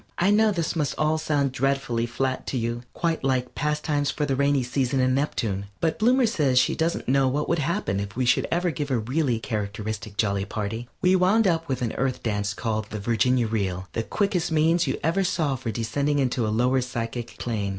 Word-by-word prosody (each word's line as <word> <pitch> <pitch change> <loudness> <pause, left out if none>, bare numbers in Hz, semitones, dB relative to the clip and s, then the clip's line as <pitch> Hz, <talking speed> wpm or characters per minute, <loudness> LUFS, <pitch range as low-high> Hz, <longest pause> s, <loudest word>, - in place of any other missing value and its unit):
I 195 +4 +3
know 215 +1 +4
this 170 -4 -1
must 150 -4 -1
all 155 +1 +1
sound 145 -3 0
dreadfully 130 -3 0
flat 130 +2 -2
to 130 - -2
you, 120 0 -2
quite 165 -4 -1
like 130 -2 0
"Pastimes 150 -1 0
for 150 - -1
the 135 -2 0
Rainy 140 -1 +2
Season 130 +1 0
in 130 0 +3
Neptune," 110 -8 -1
but 160 -1 0
Bloomer 250 +3 +4
says 150 - +1
she - - +4
doesn't 165 +1 -1
know 135 +1 +3
what 145 +3 -1
would 170 - +1
happen 135 - -1
if 100 -1 -5
we 130 +1 0
should 120 - +3
ever 175 +1 +1
give 145 0 -4
a 130 - +1
really 125 +2 0
characteristic 105 -1 -4
jolly 100 -2 +1
party. 110 +4 -4
We 180 +1 +5
wound 190 +5 +4
up 165 -3 +1
with 130 -1 -1
an 115 - -1
Earth 130 0 -1
dance 105 -3 -1
called 110 -1 -2
the 105 - -5
Virginia 120 +3 +2
Reel, 95 -4 -2
the 115 - -1
quickest 180 - -1
means 160 +2 +3
you - - 0
ever 170 +5 +2
saw 160 -6 0
for 125 -2 -5
descending 135 +5 0
to 120 -4 0
a - - 0
lower 125 +2 +3
psychic 120 -1 -5
plane. 105 -4 -2
130 Hz, 210 wpm, -25 LUFS, 115-155 Hz, -, We